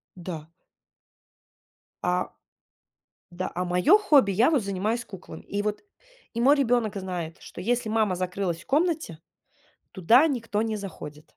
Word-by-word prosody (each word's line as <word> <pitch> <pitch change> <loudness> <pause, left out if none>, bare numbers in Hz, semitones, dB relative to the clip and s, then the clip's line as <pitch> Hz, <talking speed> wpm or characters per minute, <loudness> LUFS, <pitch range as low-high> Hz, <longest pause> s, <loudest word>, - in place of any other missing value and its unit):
Да. 165 -3 -7 1.5
А. - - +1 1.0
Да, 180 +2 -4
а, 180 - -1
моё 180 - +5
хобби, 295 - +4
я 220 +9 +4
вот 290 -6 +3
занимаюсь 205 +4 -2
куклами. 190 -3 -11
И 200 +1 -3
вот, 210 0 -2 0.5
и 235 - -2
мой 275 +4 +6
ребёнок 240 -6 +1
знает, 180 -4 -5
что - - -10
если 240 +3 0
мама 215 -4 +1
закрылась 180 -1 -2
в - - -18
комнате, 310 - 0 0.7
туда 230 - +5
никто 230 -7 -1
не 220 -1 -2
заходит. 150 -7 -8
205 Hz, 135 wpm, -26 LUFS, 180-245 Hz, 1.5 s, мой